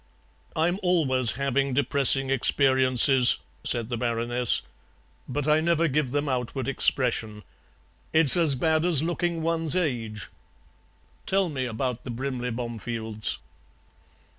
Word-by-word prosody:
"I'm 175 +4 0
always 135 -10 +1
having 140 0 -1
depressing 135 -1 +2
experiences;" 130 -1 +3 0.3
said 115 -1 -1
the 120 - -3
Baroness, 120 0 0 0.7
"but 145 +3 -3
I 155 +1 +3
never 165 0 +2
give 145 -2 0
them 145 +3 -2
outward 130 -1 -3
expression. 115 -6 -1 0.7
It's 160 -4 +7
as 165 -5 +2
bad 155 +4 +1
as 165 -5 +2
looking 170 -1 -2
one's 165 -1 0
age. 115 - -2 1.0
Tell 190 -2 +1
me 130 -4 -3
about 125 +1 -3
the - - -8
Brimley 125 0 -4
Bomefields." 115 - -4
135 Hz, 115 wpm, -25 LUFS, 120-155 Hz, 1.0 s, It's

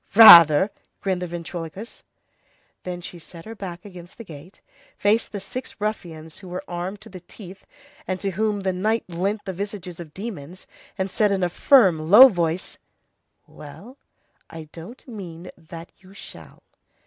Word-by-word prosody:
"Rather!" 175 -4 +9 0.3
grinned 185 -2 -2
the 180 - -4
ventriloquist. 175 +4 -8 0.8
Then 180 -1 -7
she 175 0 -8
set 165 0 -14
her 225 - -8
back 190 -3 -9
against 180 -3 -13
the 230 - -9
gate, 165 0 -14 0.4
faced 210 +3 +1
the 205 - -5
six 245 +6 -8
ruffians 165 -7 -6
who 190 - -13
were 180 +1 -6
armed 180 +3 -6
to 220 - -14
the 185 - -10
teeth, 190 +1 -14 0.4
and 185 0 -3
to 195 +1 -3
whom 210 +2 -2
the 190 -1 -1
night 215 +5 -1
lent 195 +5 -3
the 190 - -5
visages 190 -2 -7
of 160 -3 -11
demons, 185 -5 -8 0.3
and 190 -1 -3
said 210 -2 +1
in 195 -2 -1
a 175 - +1
firm, 175 - +3
low 250 +8 +10
voice:— 170 -2 -3 0.7
"Well, 210 - -13 0.5
I 160 -2 -10
don't 195 +13 -12
mean 180 -6 -9
that 165 0 -12
you 190 +1 -19
shall." - - -13
185 Hz, 160 wpm, -22 LUFS, 170-205 Hz, 0.8 s, low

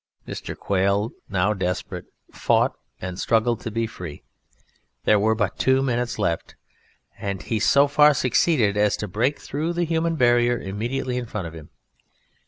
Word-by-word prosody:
Mr. - - -6
Quail, 100 +3 +1 0.2
now 100 +1 +1
desperate, 90 -3 -3 0.3
fought - - +2 0.3
and 90 0 -5
struggled 115 0 +2
to - - -4
be 115 +1 -1
free 90 -9 -8 0.8
there 105 - +4
were 110 +2 +2
but 105 -4 -2
two 130 0 +3
minutes 125 -2 -1
left 85 -6 -2 0.6
and 100 -2 -4
he 110 - -1
so 140 +7 +5
far 150 +1 +6
succeeded 125 -4 +2
as 105 -1 +2
to 105 - -4
break 120 +9 0
through 155 +5 -3
the 175 0 0
human 165 0 0
barrier 120 -3 +3
immediately 120 +6 -3
in 125 -1 -3
front 105 -4 -4
of 80 - -7
him. 80 -2 -11
115 Hz, 160 wpm, -23 LUFS, 100-130 Hz, 0.8 s, far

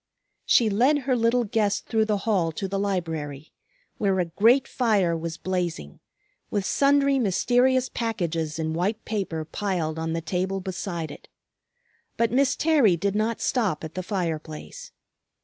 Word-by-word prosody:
She 235 - +5
led 245 +9 +3
her 260 -1 +1
little 235 +1 +2
guest 210 -2 0
through 220 -2 +1
the 210 -2 -1
hall 185 -7 +1
to 195 - -3
the 195 +1 -2
library, 160 -7 -3 0.5
where 195 -2 +1
a 180 - +2
great 230 +10 +3
fire 205 -9 +1
was 165 0 -4
blazing, 175 - -3 0.5
with 200 -2 -1
sundry 280 +1 +3
mysterious 245 +4 +2
packages 170 -11 -2
in 160 -1 -2
white 190 +7 -1
paper 185 -7 -3
piled 165 -4 -2
on 160 0 -2
the 165 - -1
table 190 +3 -2
beside 175 -4 -4
it. - - -12 0.9
But 230 -1 +2
Miss 270 +2 +3
Terry 280 - +3
did 200 +3 -1
not 220 +2 -1
stop 210 - 0
at 160 - -6
the 185 - -3
fire 175 -4 -2
place. 160 - -10
195 Hz, 155 wpm, -25 LUFS, 165-230 Hz, 0.9 s, She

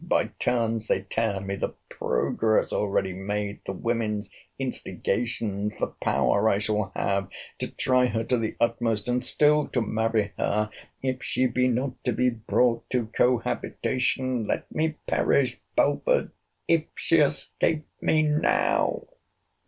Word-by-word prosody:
by - - +2
turns 115 -2 0
they - - +1
tear 110 -3 -1
me! 100 0 -4
The - - -3
progress 110 -1 0
already 100 -2 0
made—the 100 +1 -4
women's 110 0 -2 0.3
instigations—the 105 -2 -2
power 105 +2 +3
I 100 - +3
shall 105 -1 -1
have 100 -1 0 0.3
to - - -2
try 125 -1 +2
her 115 -1 -1
to 125 +1 +1
the 110 -1 -2
utmost, 115 -2 0
and 125 0 0
still 150 0 +3
to 125 - -1
marry 110 -1 0
her, 105 +1 0 0.3
if 130 -1 -1
she 130 - +1
be 125 +1 +2
not 125 +1 -2
to 125 - +2
be 125 +2 +2
brought 115 +1 +1
to 120 -4 -1
cohabitation—let 125 0 0
me 155 0 0
perish, - - +1
Belford, - - +2 0.4
if 165 -2 +3
she 165 - +2
escape 150 +1 +1 0.2
me 155 0 +3
now! 150 0 +2
115 Hz, 130 wpm, -26 LUFS, 105-130 Hz, 0.4 s, power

